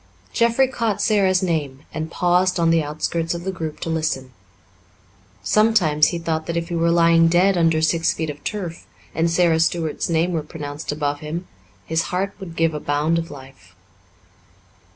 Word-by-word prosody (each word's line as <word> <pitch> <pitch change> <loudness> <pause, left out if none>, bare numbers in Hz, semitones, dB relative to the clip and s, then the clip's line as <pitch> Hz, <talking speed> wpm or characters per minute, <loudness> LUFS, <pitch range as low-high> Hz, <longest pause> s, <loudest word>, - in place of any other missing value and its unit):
Jeffrey 235 +3 +3
caught 230 -5 -2
Sara's 190 -3 +2
name 145 -6 -2
and 160 +1 -4
paused 180 +1 +1
on 165 -1 +3
the 165 -1 +3
outskirts 160 +3 -2
of 170 - -6
the 190 - -2
group 160 -4 -6
to - - -3
listen. 155 -5 -2 1.1
Sometimes 175 - +3
he 170 - -2
thought 160 -1 -3
that 170 - -2
if 170 +1 -3
he 170 - -3
were 170 0 +2
lying 165 -1 +5
dead 180 +3 +3
under 165 -2 +2
six 165 +1 +2
feet 160 -2 -3
of 145 0 -14
turf 180 -6 -5 0.3
and 165 +1 +1
Sara 165 -1 +3
Stuart's 165 -1 0
name 165 +2 +1
were 160 - 0
pronounced 150 -1 -6
above 145 -1 -2
him, 160 +4 -5 0.4
his 160 0 0
heart 190 +2 -1
would 175 -4 -8
give 165 -1 +1
a 150 - -3
bound 150 +3 0
of 165 - -5
life. 135 - -13
165 Hz, 175 wpm, -21 LUFS, 155-175 Hz, 1.1 s, lying